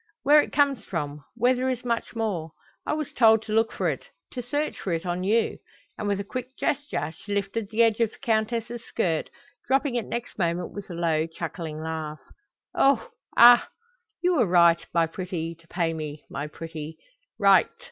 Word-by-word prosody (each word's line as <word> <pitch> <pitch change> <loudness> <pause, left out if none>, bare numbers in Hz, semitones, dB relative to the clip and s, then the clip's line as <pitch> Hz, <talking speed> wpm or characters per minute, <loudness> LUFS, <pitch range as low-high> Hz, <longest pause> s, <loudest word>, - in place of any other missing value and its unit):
Where 295 +2 +7
it - - -6
comes 280 -6 +2
from, 150 -5 -4
where 245 +2 +3
there 255 +1 -1
is 250 -1 -3
much 235 0 -2
more? 185 -8 -2 0.3
I - - +1
was 305 -2 -3
told 220 -2 +5
to 215 - -5
look 225 +1 +3
for - - -1
it, - - -2 0.3
to 250 - -4
search 290 +5 -2
for 190 - -3
it 165 +2 -2
on 175 +1 -2
you;" 220 +4 +1 0.4
and 210 - -4
with 200 -1 0
a - - -2
quick 255 +5 -6
gesture 280 - -2
she 205 +5 -5
lifted 200 +1 -2
the 225 +1 +3
edge 225 -1 +2
of 230 -2 +3
the - - -18
Countess's 230 0 -1
skirt, 165 -8 -1 0.4
dropping 270 0 +2
it 240 -3 -2
next 235 -2 -5
moment 170 0 -1
with 205 -1 -8
a 175 - -6
low, 165 -2 +1
chuckling 160 -1 -6
laugh. 160 -1 -4 0.6
"Oho! 280 - +3 0.3
aha! 240 +1 +8 0.5
You 355 -1 +3
were 240 -6 +3
right, 170 -1 +5
my 170 -1 +3
pretty, 165 -1 -4
to 165 0 -23
pay 165 -1 -1
me, 155 -2 -6
my 140 +2 -4
pretty 160 0 -8 0.4
right. - - +5
205 Hz, 190 wpm, -26 LUFS, 165-240 Hz, 0.6 s, aha